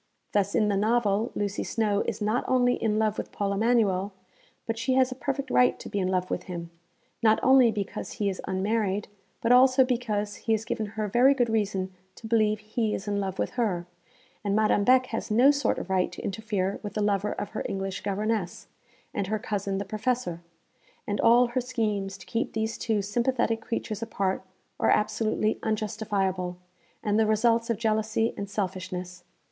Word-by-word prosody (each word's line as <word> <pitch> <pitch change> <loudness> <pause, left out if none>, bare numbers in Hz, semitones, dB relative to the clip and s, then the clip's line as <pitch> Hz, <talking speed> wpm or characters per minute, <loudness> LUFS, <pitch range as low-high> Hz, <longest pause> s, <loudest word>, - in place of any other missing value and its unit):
Thus, 200 -1 +1
in 215 -3 +3
the 205 - +1
novel 215 +1 +1
Lucy 205 0 -2
Snowe 210 -3 0
is - - -2
not 215 +4 +1
only 245 -1 +3
in 215 -3 0
love 215 -1 +1
with - - -5
Paul 200 -1 -1
Emanuel, 205 -3 +2 0.5
but 225 0 -3
she 255 +2 +1
has 260 -1 +3
a - - -4
perfect 275 0 -3
right 250 - +4
to - - -9
be 205 - -2
in 185 - 0
love 185 -1 -1
with - - -2
him, 170 -2 -6 0.5
not 220 -1 +4
only 260 -2 +6
because 210 +1 -4
he 205 - -1
is 190 -2 -2
unmarried, 200 +1 0 0.3
but 230 - +2
also 255 +1 +6
because 215 -5 -1
he 225 - 0
has 220 0 -1
given 225 -3 -2
her 215 -1 0
very 250 +7 +5
good 245 -3 +1
reason 195 -4 -1 0.2
to - - -12
believe 215 -1 +2
he 215 0 -1
is 195 - -7
in 205 0 0
love 190 -1 -3
with - - -1
her: 200 -8 -1 0.6
and 200 -1 0
Madame 215 -1 +3
Beck 255 +3 +5
has - - -3
no 245 +6 +6
sort 285 -1 0
of 190 - -5
right 185 -1 +1
to - - -8
interfere 200 -2 -2
with 205 - -7
the 210 - 0
lover 205 0 +1
of 205 - -5
her 215 - -4
English 195 0 -3
governess, 205 -1 -2 0.5
and 200 -2 -2
her 215 +2 0
cousin 200 -2 -2
the 200 - -3
Professor; 215 -3 -2 0.6
and 205 - -1
all 240 +1 +5
her 255 +1 0
schemes 210 -6 -2
to 180 - -13
keep 230 +5 -2
these 220 0 -1
two 215 -3 -1
sympathetic 230 +1 0
creatures 220 -2 -4
apart 195 -4 -1 0.4
are - - +2
absolutely 215 0 +1
unjustifiable, 205 -4 -1 0.5
and 210 0 +2
the 220 - +3
results 230 +2 +2
of 230 - +1
jealousy 220 0 0
and 200 0 -5
selfishness. 185 -3 -4
215 Hz, 190 wpm, -27 LUFS, 200-230 Hz, 0.6 s, only